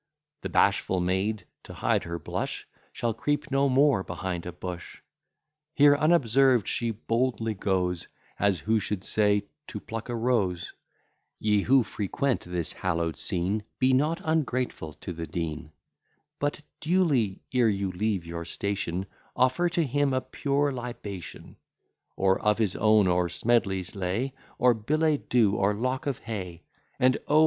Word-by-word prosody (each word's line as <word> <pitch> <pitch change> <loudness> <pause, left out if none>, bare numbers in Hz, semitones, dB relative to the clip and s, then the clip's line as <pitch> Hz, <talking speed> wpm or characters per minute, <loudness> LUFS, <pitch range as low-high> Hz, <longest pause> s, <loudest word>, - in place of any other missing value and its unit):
The - - -4
bashful 95 - +2
maid, 95 +4 -1 0.2
to - - -11
hide - - +1
her 85 0 -4
blush, 80 - -4 0.2
Shall 120 -1 -1
creep 145 +5 -2
no 135 +1 +3
more 135 -4 +4
behind 90 -1 -4
a - - -4
bush; 90 0 -7 0.8
Here 145 0 +7
unobserved 135 - +3
she 120 - 0
boldly 115 +1 -1
goes, 90 -3 -1 0.3
As 100 -2 +2
who 110 +1 +2
should 100 -1 -3
say, 105 -1 +2 0.2
to 105 - -6
pluck 115 +3 -7
a 120 - -2
rose, 110 -8 0 0.7
Ye, 105 -1 +2
who 130 +4 +4
frequent 110 +5 -1
this 90 -2 -2
hallow'd 85 -3 -1
scene, 100 +2 -1
Be 130 0 +3
not 155 +6 +2
ungrateful 130 - -1
to 90 - -5
the 80 0 -6
Dean; 80 -3 -4 0.7
But 145 +1 -1 0.2
duly, 155 - +1
ere 125 -3 +4
you 100 -2 -1
leave 95 -1 -1
your 85 0 -5
station, 95 0 -3 0.3
Offer 130 +8 +2
to 170 0 +1
him 145 0 +1
a 130 - +1
pure 140 +2 0
libation, 110 - -7 0.6
Or 95 0 +2
of 105 -1 +2
his 105 -5 0
own 110 -1 +4
or 90 -1 +2
Smedley's 100 -6 0
lay, 100 +8 -2 0.2
Or 125 0 +5
billet 150 +7 0
doux, 115 -5 +4
or 100 +1 +2
lock 130 +7 -2
of 135 -4 -1
hay: 95 -7 -6 0.4
And, 130 0 +4
O! 150 +1 +5
110 Hz, 150 wpm, -27 LUFS, 95-130 Hz, 0.8 s, Here